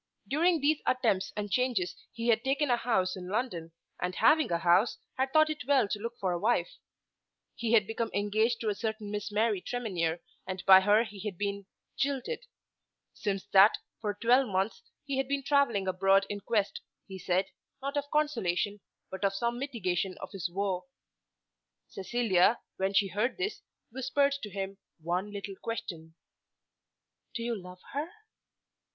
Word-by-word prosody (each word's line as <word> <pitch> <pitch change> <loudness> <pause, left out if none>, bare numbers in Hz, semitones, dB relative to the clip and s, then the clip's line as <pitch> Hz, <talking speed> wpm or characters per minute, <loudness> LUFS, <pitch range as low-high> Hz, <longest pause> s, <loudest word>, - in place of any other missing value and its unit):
During 330 +3 +2
these 300 +2 +2
attempts 225 -7 +1
and 205 -1 -3
changes 230 -9 +1 0.2
he 230 +1 -2
had 225 -1 +3
taken 275 +1 +1
a - - +5
house 220 -6 0
in 180 -1 -7
London, 185 -6 -2 0.3
and 180 +1 -2
having 305 - +4
a 170 - +2
house 175 +6 +3 0.2
had 265 0 0
thought 310 +1 +5
it 305 - -6
well 275 -7 +4
to 210 - -2
look 230 +3 -5
for 190 -2 0
a 175 - -1
wife. 240 - 0 0.7
He 235 -1 -2
had 215 -3 +6
become 225 +2 -2
engaged 215 +4 +1
to 220 - 0
a - - +1
certain 220 -1 -4
Miss 210 0 -3
Mary 210 -2 +1
Tremenhere, 180 -10 -2 0.3
and 185 0 -5
by 190 -1 +10
her 210 +3 +4
he 210 -3 -10
had 200 -2 -5
been 200 0 -3 0.3
jilted. 280 - -2 0.7
Since 195 -2 -3
that, 200 +2 +7 0.2
for 210 -2 -2
twelve 245 +5 +4
months 195 - -1 0.2
he 275 -2 -2
had 270 -1 0
been 280 0 -1
travelling 260 -9 +2
abroad 195 +1 +3
in 205 - -3
quest, 220 - -1 0.2
he 190 -2 -8
said, 185 +1 +1 0.3
not 275 +1 -4
of 285 0 -2
consolation, 210 - 0 0.3
but 190 +2 -6
of 195 0 +2
some 235 +4 -1
mitigation 190 -9 -2
of - - -8
his 185 -4 -3
woe. 190 +2 -2 1.0
Cecilia, 210 0 +2 0.2
when 190 +1 0
she 195 0 +4
heard 215 +7 -1
this, 380 +3 -3 0.3
whispered 265 +3 +1
to 210 - -5
him 195 0 -5 0.2
one 180 +5 -2
little 200 -1 -6
question, 165 -8 -5 1.2
"Do 230 - -2
you 235 0 -1
love 180 -2 -10
her?" 295 +4 -2
210 Hz, 170 wpm, -30 LUFS, 190-250 Hz, 1.2 s, by